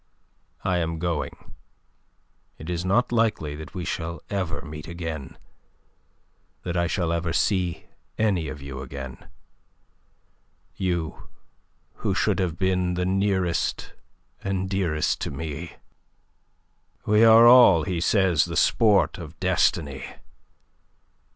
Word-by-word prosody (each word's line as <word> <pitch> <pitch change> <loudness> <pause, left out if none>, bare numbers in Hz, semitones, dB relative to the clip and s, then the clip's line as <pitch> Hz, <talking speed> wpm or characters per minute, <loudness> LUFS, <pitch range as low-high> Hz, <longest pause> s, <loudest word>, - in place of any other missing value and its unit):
I 90 - +1
am 80 -1 -2
going. 80 -4 -4 1.0
It 80 +3 -6
is 85 -1 -2
not 100 +8 +1
likely 110 -10 +1
that 80 +5 -10
we 90 -2 -4
shall 85 -1 -4
ever 95 -5 -2
meet 75 +1 -8
again 80 -5 -6 1.3
that 90 - -3
I 85 -1 +1
shall 85 -1 -1
ever 85 0 -1
see 90 -1 0 0.3
any 100 -8 +1
of 70 0 -7
you 65 -1 -7
again 65 -1 -8 1.5
you 85 -4 -3 0.7
who - - -1
should - - +1
have 85 -3 -1
been 90 -1 0
the 90 0 -1
nearest 95 -2 0 0.5
and 95 -1 -1
dearest 90 -6 0
to - - -2
me. 80 +3 -6 1.3
We 105 +1 +4
are 115 +1 +8
all, 120 -9 +8
he 90 -2 -2
says, 95 -4 +3
the - - -4
sport 105 -3 +3
of 80 -1 -10
destiny. 85 -6 +1
85 Hz, 120 wpm, -25 LUFS, 80-95 Hz, 1.5 s, are